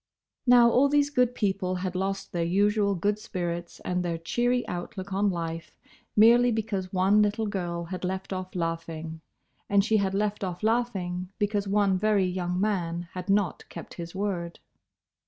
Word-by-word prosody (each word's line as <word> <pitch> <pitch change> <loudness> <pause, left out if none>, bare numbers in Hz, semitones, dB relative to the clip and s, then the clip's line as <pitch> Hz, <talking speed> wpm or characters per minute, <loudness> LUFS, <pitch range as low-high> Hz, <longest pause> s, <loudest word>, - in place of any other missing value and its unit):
Now, 245 -1 +7
all 275 +4 +4
these 290 0 +2
good 250 -3 +2
people 190 -4 0
had 180 0 -3
lost 195 +1 -3
their 170 -1 -1
usual 200 +3 +2
good 205 +4 0
spirits 175 -4 -4
and 180 0 -1
their 170 -1 -2
cheery 245 +9 0
outlook 185 +2 -5
on 200 +1 +2
life 165 -3 -5 0.4
merely 240 +3 +6
because 205 -4 -2
one 195 +3 +4
little 210 +2 +1
girl 175 -4 -3
had 180 +1 -6
left 190 +1 -3
off 185 0 -6
laughing; 165 -1 -4 0.5
and 200 -1 +4
she 220 0 +3
had 195 -1 0
left 210 0 -1
off 180 0 -4
laughing 195 -6 -1
because 205 -1 0
one 200 -2 +2
very 210 -2 +3
young 180 0 -2
man 175 -4 -1
had 185 +2 -6
not 195 -3 0
kept - - -9
his 170 +1 -8
word. 185 -4 -3
190 Hz, 165 wpm, -27 LUFS, 175-210 Hz, 0.5 s, Now